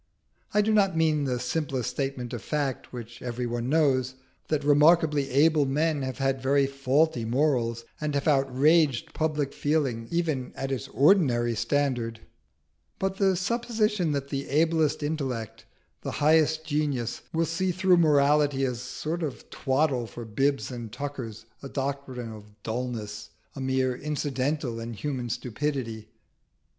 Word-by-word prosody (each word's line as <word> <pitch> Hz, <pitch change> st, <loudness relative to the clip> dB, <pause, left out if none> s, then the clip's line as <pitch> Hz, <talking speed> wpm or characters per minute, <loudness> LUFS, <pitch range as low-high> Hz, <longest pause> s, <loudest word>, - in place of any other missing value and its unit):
I 210 Hz, -, +4 dB
do 220 Hz, +1 st, +2 dB
not 195 Hz, -5 st, +3 dB
mean 155 Hz, -3 st, +2 dB
the 125 Hz, -2 st, -1 dB
simple 130 Hz, 0 st, -2 dB
statement 135 Hz, -1 st, -3 dB
of 120 Hz, -, -4 dB
fact, 145 Hz, -4 st, -2 dB
which 120 Hz, -1 st, -9 dB
everybody 120 Hz, -1 st, -3 dB
knows, 130 Hz, -4 st, +2 dB, 0.3 s
that 150 Hz, -2 st, 0 dB
remarkably 150 Hz, -1 st, +4 dB
able 145 Hz, +2 st, +4 dB
men 150 Hz, +2 st, +1 dB
have 130 Hz, -1 st, -4 dB
had 135 Hz, -1 st, 0 dB
very 140 Hz, +1 st, +3 dB
faulty 135 Hz, 0 st, +1 dB
morals, 120 Hz, -2 st, 0 dB, 0.2 s
and 150 Hz, -1 st, -1 dB
have 140 Hz, -, -1 dB
outraged 140 Hz, 0 st, +3 dB
public 150 Hz, -3 st, -1 dB
feeling 135 Hz, -7 st, 0 dB
even 160 Hz, -7 st, -1 dB
at 135 Hz, 0 st, -3 dB
its 130 Hz, -5 st, -3 dB
ordinary 135 Hz, -8 st, +3 dB
standard; 120 Hz, -2 st, -1 dB, 0.8 s
but 190 Hz, 0 st, -2 dB
the 195 Hz, -2 st, +3 dB
supposition 210 Hz, -3 st, 0 dB
that 140 Hz, -1 st, -3 dB
the 140 Hz, 0 st, -4 dB
ablest 160 Hz, 0 st, +2 dB
intellect, 135 Hz, -8 st, -3 dB, 0.4 s
the -, -, -4 dB
highest 155 Hz, +1 st, +3 dB
genius, 145 Hz, -6 st, -1 dB
will 165 Hz, 0 st, +1 dB
see 180 Hz, +3 st, 0 dB
through 185 Hz, 0 st, +3 dB
morality 145 Hz, -3 st, +4 dB
as 125 Hz, -2 st, -2 dB
a -, -, -7 dB
sort 155 Hz, +6 st, -4 dB
of 150 Hz, -5 st, -5 dB
twaddle 135 Hz, -3 st, 0 dB
for 120 Hz, +1 st, -8 dB
bibs 135 Hz, +6 st, 0 dB
and 120 Hz, -3 st, -6 dB
tuckers, 125 Hz, -4 st, -6 dB, 0.2 s
a 135 Hz, -, -7 dB
doctrine 135 Hz, -4 st, -4 dB
of 105 Hz, -1 st, -12 dB
dulness, 110 Hz, -3 st, -4 dB, 0.3 s
a 135 Hz, -, -6 dB
mere 130 Hz, -1 st, +1 dB
incident 145 Hz, 0 st, -1 dB
in 115 Hz, -2 st, -4 dB
human 125 Hz, 0 st, -3 dB
stupidity. 115 Hz, -2 st, -3 dB
140 Hz, 145 wpm, -27 LUFS, 125-155 Hz, 0.8 s, I